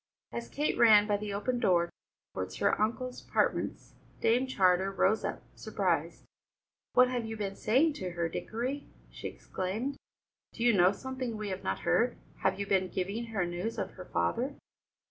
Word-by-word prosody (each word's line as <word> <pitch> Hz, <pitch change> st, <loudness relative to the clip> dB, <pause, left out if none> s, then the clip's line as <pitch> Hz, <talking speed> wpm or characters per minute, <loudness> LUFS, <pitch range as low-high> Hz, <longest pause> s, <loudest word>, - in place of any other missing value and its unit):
As 235 Hz, 0 st, -5 dB
Kate 295 Hz, +2 st, -1 dB
ran 215 Hz, -3 st, +8 dB
by 205 Hz, -1 st, +1 dB
the 210 Hz, 0 st, -5 dB
open 240 Hz, +5 st, -1 dB
door 175 Hz, -6 st, +3 dB, 0.4 s
towards 95 Hz, 0 st, -4 dB
her -, -, +1 dB
uncle's 250 Hz, +3 st, -1 dB
apartments, -, -, -1 dB, 0.3 s
Dame 245 Hz, +4 st, +3 dB
Charter 190 Hz, -5 st, +3 dB
rose 200 Hz, +2 st, +2 dB
up, -, -, -3 dB
surprised. -, -, -1 dB, 0.7 s
"What 250 Hz, 0 st, +7 dB
have 245 Hz, -2 st, -1 dB
you 225 Hz, 0 st, -5 dB
been 195 Hz, -2 st, -3 dB
saying 280 Hz, +11 st, +3 dB
to 185 Hz, -, -2 dB
her, 170 Hz, -1 st, 0 dB
Dickory?" 245 Hz, -, -3 dB, 0.2 s
she -, -, -6 dB
exclaimed. 220 Hz, +10 st, -4 dB, 0.6 s
"Do 235 Hz, -, -4 dB
you 240 Hz, -1 st, +5 dB
know 180 Hz, -1 st, +6 dB
something 255 Hz, +1 st, -4 dB
we 210 Hz, -1 st, -4 dB
have 185 Hz, -, -4 dB
not 95 Hz, +1 st, -2 dB
heard? 240 Hz, -, +2 dB, 0.2 s
Have 190 Hz, 0 st, 0 dB
you 200 Hz, -, -1 dB
been 190 Hz, -2 st, +2 dB
giving 200 Hz, +6 st, -2 dB
her 215 Hz, -6 st, -1 dB
news 175 Hz, +6 st, -3 dB
of -, -, -2 dB
her -, -, -10 dB
father?" 260 Hz, +4 st, -1 dB
215 Hz, 170 wpm, -31 LUFS, 185-245 Hz, 0.7 s, ran